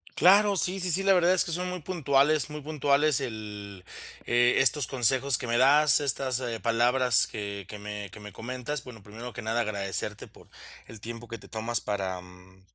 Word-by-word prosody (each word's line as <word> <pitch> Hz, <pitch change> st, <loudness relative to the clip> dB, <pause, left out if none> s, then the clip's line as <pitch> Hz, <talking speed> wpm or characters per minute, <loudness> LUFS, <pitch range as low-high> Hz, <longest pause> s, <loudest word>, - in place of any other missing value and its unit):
Claro, 200 Hz, +4 st, +4 dB
sí, 185 Hz, +3 st, +4 dB
sí, 180 Hz, -1 st, +4 dB
sí, 185 Hz, -, +6 dB
la 195 Hz, 0 st, +4 dB
verdad 180 Hz, 0 st, +3 dB
es 185 Hz, -, +3 dB
que -, -, -4 dB
son 180 Hz, +2 st, -3 dB
muy 180 Hz, -, -6 dB
puntuales, 150 Hz, -4 st, +1 dB
muy 150 Hz, 0 st, -8 dB
puntuales 145 Hz, -1 st, +1 dB
el 105 Hz, -5 st, -8 dB, 0.4 s
eh, 120 Hz, 0 st, +2 dB
estos 135 Hz, 0 st, +3 dB
consejos 130 Hz, +1 st, +2 dB
que 125 Hz, -, -7 dB
me 120 Hz, 0 st, 0 dB
das, 145 Hz, +2 st, +5 dB
estas 130 Hz, -1 st, -1 dB, 0.2 s
palabras 120 Hz, +1 st, +2 dB
que 100 Hz, -2 st, -7 dB
que 105 Hz, -, -10 dB
me 105 Hz, -1 st, -7 dB
que 105 Hz, -, -12 dB
me 105 Hz, -2 st, -12 dB
comentas. 125 Hz, +4 st, -6 dB
Bueno, 115 Hz, -4 st, -13 dB
primero 115 Hz, +5 st, -10 dB
que 125 Hz, -, -8 dB
nada 115 Hz, +2 st, -2 dB
agradecerte 100 Hz, -3 st, -5 dB
por -, -, -20 dB, 0.4 s
el 110 Hz, -, -12 dB
tiempo 115 Hz, +1 st, -9 dB
que 115 Hz, 0 st, -8 dB
te -, -, -16 dB
tomas 115 Hz, 0 st, -3 dB
para, 95 Hz, -3 st, -4 dB
mm 90 Hz, +1 st, -18 dB
120 Hz, 195 wpm, -26 LUFS, 105-150 Hz, 0.4 s, sí